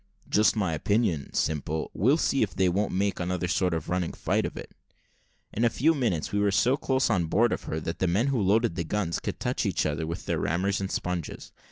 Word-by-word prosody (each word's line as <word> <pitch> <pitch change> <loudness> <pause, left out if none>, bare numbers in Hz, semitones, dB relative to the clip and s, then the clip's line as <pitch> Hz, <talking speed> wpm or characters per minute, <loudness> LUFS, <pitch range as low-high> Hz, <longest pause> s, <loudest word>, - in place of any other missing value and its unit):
"Just 105 +1 +3
my 95 -6 0
opinion, 90 - 0
Simple; 80 +1 -2
we'll 130 - +3
see 135 -4 +1
if 105 - 0
they 95 - +2
won't 100 +4 0
make 100 +1 0
another 90 0 -1
sort 90 +1 +1
of 80 - -4
running 90 -1 -1
fight - - 0
of - - -9
it." - - -8 0.8
In 115 - -1
a 120 - +5
few 155 +8 +2
minutes 115 - -1
we 105 - 0
were 100 0 +3
so 120 +6 +3
close 130 -3 0
on 90 -6 +1
board 115 +8 +3
of - - -5
her 80 - -3
that 85 - -4
the 95 - +1
men 100 +8 +2
who 130 -5 +1
loaded 105 +2 +2
the 85 0 -2
guns 85 0 -2
could - - -5
touch - - -1
each - - 0
other 80 +1 -2
with 85 - -5
their - - -1
rammers 95 +4 0
and 95 - -3
sponges. 90 -3 -4
95 Hz, 230 wpm, -27 LUFS, 85-110 Hz, 0.8 s, a